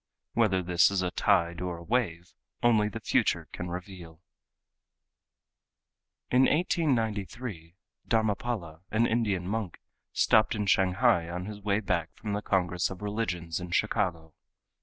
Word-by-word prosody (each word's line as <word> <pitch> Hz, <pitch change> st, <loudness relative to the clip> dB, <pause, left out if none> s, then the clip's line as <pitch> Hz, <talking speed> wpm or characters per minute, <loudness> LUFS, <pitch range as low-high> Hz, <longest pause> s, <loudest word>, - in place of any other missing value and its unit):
Whether 95 Hz, -5 st, +2 dB
this 90 Hz, -1 st, +4 dB
is 95 Hz, -2 st, 0 dB
a 90 Hz, -, -1 dB
tide, 85 Hz, -4 st, +1 dB
or 90 Hz, -2 st, -3 dB
a 85 Hz, -, -10 dB
wave, 90 Hz, -6 st, -1 dB, 0.3 s
only 110 Hz, -3 st, +4 dB
the -, -, -6 dB
future -, -, +1 dB
can 90 Hz, -, -5 dB
reveal. 90 Hz, -2 st, -8 dB, 2.1 s
In 130 Hz, +1 st, +5 dB
1893 115 Hz, -, -1 dB, 0.3 s
Dharmapala, 105 Hz, -6 st, -1 dB
an 115 Hz, +2 st, +2 dB
Indian 105 Hz, -6 st, 0 dB
monk, 105 Hz, -3 st, -3 dB, 0.3 s
stopped 110 Hz, +1 st, +3 dB
in 105 Hz, -1 st, -1 dB
Shanghai 95 Hz, -1 st, +3 dB
on 90 Hz, +1 st, -4 dB
his 105 Hz, 0 st, -8 dB
way 100 Hz, +1 st, +1 dB
back 85 Hz, -6 st, -2 dB
from 105 Hz, -2 st, -5 dB
the 105 Hz, -, -1 dB
Congress 90 Hz, -3 st, 0 dB
of 95 Hz, +1 st, -8 dB
Religions 90 Hz, -6 st, -2 dB
in 90 Hz, 0 st, -7 dB
Chicago. 85 Hz, -5 st, -1 dB
95 Hz, 135 wpm, -29 LUFS, 90-110 Hz, 2.1 s, In